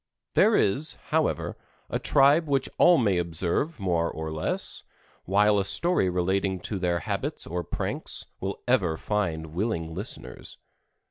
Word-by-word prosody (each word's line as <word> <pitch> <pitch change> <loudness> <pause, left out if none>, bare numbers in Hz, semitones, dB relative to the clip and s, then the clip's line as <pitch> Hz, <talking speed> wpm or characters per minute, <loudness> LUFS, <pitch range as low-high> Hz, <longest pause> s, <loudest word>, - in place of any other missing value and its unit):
There - - +5
is, 140 +10 +1
however, - - 0 0.3
a - - -2
tribe 145 +4 +4
which 135 -2 +1
all 175 -1 +7
may 100 - +2
observe 85 - -1
more 85 -3 0
or 80 0 -5
less, 80 0 -3 0.4
while 105 +2 +3
a - - +1
story 100 - +2
relating 95 +1 0
to 100 +1 -4
their 85 -2 0
habits - - -3
or 90 +1 -3
pranks - - -2
will 95 +1 -5
ever 95 -11 +2
find 80 -7 -2
willing 85 -4 -2
listeners. 80 - -6
95 Hz, 140 wpm, -26 LUFS, 85-110 Hz, 0.4 s, all